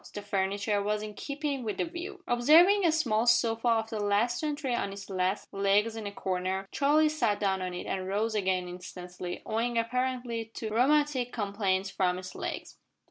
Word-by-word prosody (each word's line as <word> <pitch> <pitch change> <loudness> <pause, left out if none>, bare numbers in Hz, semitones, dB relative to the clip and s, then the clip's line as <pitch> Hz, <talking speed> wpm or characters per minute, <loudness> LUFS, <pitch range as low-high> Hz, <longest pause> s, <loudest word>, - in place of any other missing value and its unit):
The 205 - -5
furniture 200 +1 0
was 210 +1 -1
in 210 0 -6
keeping 280 +2 -3
with 215 -3 -3
the - - 0
view. 360 +3 -7
Observing 330 +12 +6
a - - +4
small 240 -8 +1
sofa 230 0 +3
of 225 0 +1
the 220 - -3
last 205 +4 +1
century 295 -4 -2
on 200 -4 -1
its 200 0 -9
last 185 +1 -1
legs 200 +3 +2
in 220 -2 -5
a - - -4
corner, 190 0 -2
Charlie 300 +2 +3
sat 240 -9 0
down 190 -2 0
on 180 -1 -3
it - - -5
and 185 -1 -3
rose 215 +3 0
again 190 -3 0
instantly, 180 0 -7
owing 230 +2 -1
apparently 245 0 -1
to 220 - -4
rheumatic 260 +2 +2
complaints 200 -3 -1
from 180 -2 +1
its 185 0 -8
legs. - - -6
215 Hz, 185 wpm, -29 LUFS, 195-250 Hz, -, Observing